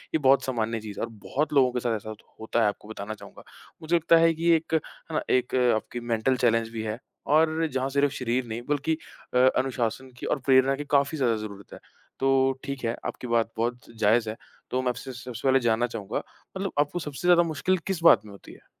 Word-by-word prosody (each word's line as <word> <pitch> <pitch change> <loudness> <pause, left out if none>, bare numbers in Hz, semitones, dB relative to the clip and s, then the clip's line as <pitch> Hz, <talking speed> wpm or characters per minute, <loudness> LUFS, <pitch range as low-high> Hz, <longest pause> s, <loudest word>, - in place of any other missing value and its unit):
ये - - +6
बहुत 135 -1 +4
सामान्य 115 -3 -1
चीज़ 105 -2 -8
है - - -2
और 115 - -12
बहुत 150 +2 -1
लोगों 130 -3 +4
के 125 - -2
साथ 115 -2 0
ऐसा 110 +1 -7
होत 110 - -9 0.2
होता 110 +1 0
है, 110 - +4
आपको 105 +1 -4
बताना 110 -1 -6
चाहूँगा। 110 - -13 0.4
मुझे 165 +2 +1
लगता 165 0 +5
है 165 0 +5
कि 165 +2 0
एक, 160 0 -3
है 160 - +4 0.4
ना, - - +1
एक 125 0 +1 0.2
आपकी 115 +2 -4
मेंटल 120 +2 0
चैलेंज 115 -2 +2
भी 115 -1 -4
है, 110 0 -3 0.3
और 160 +2 +3
जहाँ 130 0 0
सिर्फ़ 140 0 +1
शरीर 125 0 -1
नहीं, 115 +1 -4
बल्कि 150 +2 0 0.4
अ, 125 - +2 0.2
अनुशासन 130 0 -1
की - - -7
और - - 0
प्रेरणा 135 0 +5
की 145 +1 -6
काफ़ी 140 +2 +2
ज़्यादा 120 -4 +2
ज़रूरत 100 -2 -8
है, - - -10 0.4
तो 135 0 +3
ठीक 140 -2 -5
है, 115 - 0
आपकी 125 - -5
बात 115 -1 +1
बहुत 120 +2 -1 0.2
जायज़ 110 +1 +3
है। 110 - -4 0.4
तो 130 - +1
मैं 130 - 0
आपसे 130 +2 -5
सबसे 125 +1 -5
पहले 135 0 +5
जानना 120 0 +1
चाहूँगा, 110 -4 -5 0.4
मतलब 195 -1 -3
आपको 150 +4 +1
सबसे 150 +1 -5
ज़्यादा 175 -1 +6
मुश्किल 165 +3 0
किस 185 -4 -2
बात 110 -9 +7
में 105 - -11
होती 100 - -13
है? - - -18
130 Hz, 225 wpm, -26 LUFS, 115-145 Hz, 0.4 s, बात